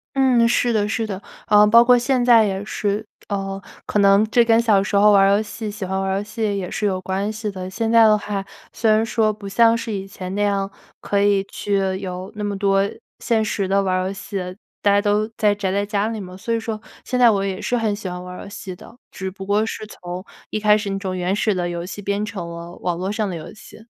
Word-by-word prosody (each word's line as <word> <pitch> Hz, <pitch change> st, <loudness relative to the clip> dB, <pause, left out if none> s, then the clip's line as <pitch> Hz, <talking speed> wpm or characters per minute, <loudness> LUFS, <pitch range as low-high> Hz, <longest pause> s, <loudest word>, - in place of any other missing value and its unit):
嗯， 255 Hz, -3 st, +4 dB
是 240 Hz, +1 st, +2 dB
的， 210 Hz, -2 st, +1 dB
是 225 Hz, 0 st, -1 dB
的。 195 Hz, -3 st, -4 dB, 0.3 s
呃， 210 Hz, 0 st, +6 dB
包 230 Hz, +3 st, +7 dB
括 245 Hz, +1 st, +6 dB
现 250 Hz, +1 st, +1 dB
在 235 Hz, -3 st, +6 dB
也 195 Hz, -1 st, -2 dB
是， 205 Hz, 0 st, -2 dB, 0.3 s
呃， 195 Hz, -1 st, -3 dB, 0.3 s
可 -, -, -1 dB
能 200 Hz, +1 st, +5 dB
这 240 Hz, +1 st, +4 dB
跟 230 Hz, 0 st, +4 dB
小 215 Hz, -4 st, +4 dB
时 205 Hz, -, -3 dB
候 210 Hz, +1 st, +6 dB
玩 200 Hz, -1 st, +6 dB
儿 195 Hz, -, +5 dB
游 -, -, 0 dB
戏 215 Hz, 0 st, -6 dB
喜 210 Hz, 0 st, -7 dB
欢 190 Hz, +1 st, -2 dB
玩 195 Hz, -, -1 dB
儿 190 Hz, -, 0 dB
游 200 Hz, -, -2 dB
戏 215 Hz, -1 st, -2 dB
也 190 Hz, -2 st, -3 dB
是 210 Hz, -, -2 dB
有 190 Hz, -2 st, 0 dB
关 190 Hz, +3 st, -2 dB
系 215 Hz, 0 st, -4 dB
的。 185 Hz, -2 st, -6 dB
现 225 Hz, +4 st, -2 dB
在 230 Hz, 0 st, +7 dB
的 215 Hz, -1 st, +6 dB
话， 205 Hz, -2 st, -3 dB, 0.3 s
虽 225 Hz, -, 0 dB
然 215 Hz, +1 st, +4 dB
说 220 Hz, -2 st, +1 dB
不 205 Hz, -1 st, -9 dB
像 230 Hz, +2 st, +4 dB
是 230 Hz, 0 st, -4 dB
以 195 Hz, -2 st, -4 dB
前 185 Hz, -1 st, -7 dB
那 205 Hz, -, +1 dB
样， 195 Hz, -1 st, 0 dB, 0.3 s
可 200 Hz, -, 0 dB
以 200 Hz, -1 st, +3 dB
去 195 Hz, -1 st, -1 dB
有 185 Hz, 0 st, -6 dB
那 210 Hz, -, -5 dB
么 205 Hz, -1 st, -2 dB
多 195 Hz, 0 st, +2 dB, 0.4 s
现 225 Hz, -2 st, +1 dB
实 200 Hz, -2 st, -1 dB
地 195 Hz, +1 st, +2 dB
玩 185 Hz, -1 st, 0 dB
儿 -, -, -2 dB
游 195 Hz, -, -3 dB
戏， 195 Hz, 0 st, -6 dB, 0.5 s
大 205 Hz, -, +4 dB
家 205 Hz, -, +4 dB
都 210 Hz, +1 st, +1 dB
在 210 Hz, -1 st, +2 dB
宅 200 Hz, -2 st, -2 dB
在 200 Hz, +1 st, 0 dB
家 205 Hz, 0 st, -1 dB
里 225 Hz, -1 st, -4 dB
嘛， 185 Hz, -1 st, -9 dB
所 230 Hz, +4 st, -3 dB
以 230 Hz, -, +1 dB
说 225 Hz, -1 st, -4 dB, 0.2 s
现 250 Hz, -, -2 dB
在 240 Hz, -2 st, +7 dB
我 195 Hz, -1 st, 0 dB
也 195 Hz, -1 st, -3 dB
是 245 Hz, -, -1 dB
很 220 Hz, -3 st, 0 dB
喜 205 Hz, -2 st, -7 dB
欢 180 Hz, 0 st, -5 dB
玩 180 Hz, 0 st, -8 dB
儿 -, -, -8 dB
游 200 Hz, -, -10 dB
戏 190 Hz, -2 st, -7 dB
的， 230 Hz, -, -14 dB
只 190 Hz, -1 st, -5 dB
不 195 Hz, 0 st, -9 dB
过 205 Hz, +2 st, +1 dB
是 220 Hz, -, -5 dB
从 180 Hz, -3 st, -7 dB, 0.3 s
一 215 Hz, -, -1 dB
开 210 Hz, 0 st, +5 dB
始 205 Hz, -2 st, -3 dB
那 195 Hz, -, -2 dB
种 185 Hz, -2 st, -4 dB
原 180 Hz, +2 st, 0 dB
始 210 Hz, -1 st, +1 dB
的 175 Hz, -1 st, -1 dB
游 170 Hz, 0 st, -4 dB
戏 200 Hz, +3 st, -7 dB
变 200 Hz, +1 st, -1 dB
成 205 Hz, -5 st, -5 dB
了 170 Hz, 0 st, -8 dB
网 175 Hz, -1 st, -1 dB
络 190 Hz, +2 st, -2 dB
上 215 Hz, 0 st, -1 dB
的 185 Hz, -, -4 dB
游 160 Hz, -, -8 dB
戏。 220 Hz, +1 st, -14 dB
205 Hz, 285 characters per minute, -21 LUFS, 195-215 Hz, 0.5 s, 包